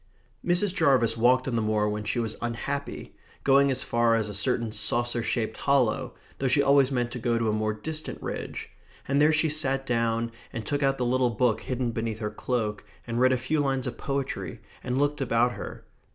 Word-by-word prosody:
Mrs. 180 +2 +2
Jarvis 125 - +3
walked 125 +3 +3
on 125 - -1
the 115 - +1
moor 105 -1 +1
when 105 0 -2
she 115 - -1
was 115 -2 -2
unhappy, 140 +4 -4 0.3
going 140 +1 +5
as 130 -1 0
far 120 -1 +2
as 110 -2 -1
a - - -5
certain 115 +2 +1
saucer 120 +3 +1
shaped 110 -1 -2
hollow, 135 -6 +1 0.2
though 135 - 0
she 140 +3 +4
always 140 -1 +4
meant 120 -2 -1
to 125 - -5
go 120 0 +1
to 115 -1 0
a - - +1
more 110 0 0
distant 155 +9 -5
ridge; - - -6 0.4
and 140 +1 +2
there 150 +1 +5
she 155 +1 +2
sat 135 -3 0
down, 115 -1 0 0.2
and 115 -4 -5
took 145 +6 -1
out 135 -1 +2
the 125 - -1
little 125 0 +2
book 115 0 +1
hidden 125 -2 -2
beneath 115 -1 -3
her 105 -2 -3
cloak 110 -5 -2 0.2
and 120 0 -2
read 130 +1 +5
a 130 - +3
few 130 +5 -1
lines 135 -3 0
of 125 - -5
poetry, 140 -1 -3 0.2
and 125 +1 -2
looked 145 +1 0
about 120 -1 +2
her. - - -8
125 Hz, 210 wpm, -27 LUFS, 115-135 Hz, 0.4 s, going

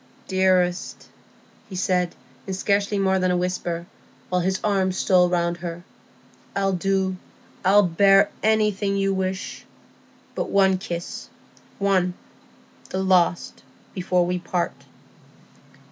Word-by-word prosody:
"Dearest," 185 -2 +1 0.6
he 190 - -8
said, 180 -2 0 0.3
in 190 - -3
scarcely 200 +1 0
more 190 -1 +2
than 185 0 +1
a 180 - +2
whisper, 175 -1 -2 0.4
while 180 0 +1
his 190 +1 0
arm 195 -3 +1
stole 180 -1 +3
round 170 -1 0
her, 175 0 -6 0.7
"I'll 195 -1 +1
do, 190 0 0 0.5
I'll 200 +3 +5
bear 195 +3 +4
anything 210 -2 +1
you 195 0 +1
wish. 190 0 -3 0.7
But—one 190 -1 +2
kiss—one—the 180 +1 -3 0.9
last—before 180 0 0
we 180 +1 -1
part." 175 0 -3
185 Hz, 100 wpm, -23 LUFS, 180-195 Hz, 0.9 s, I'll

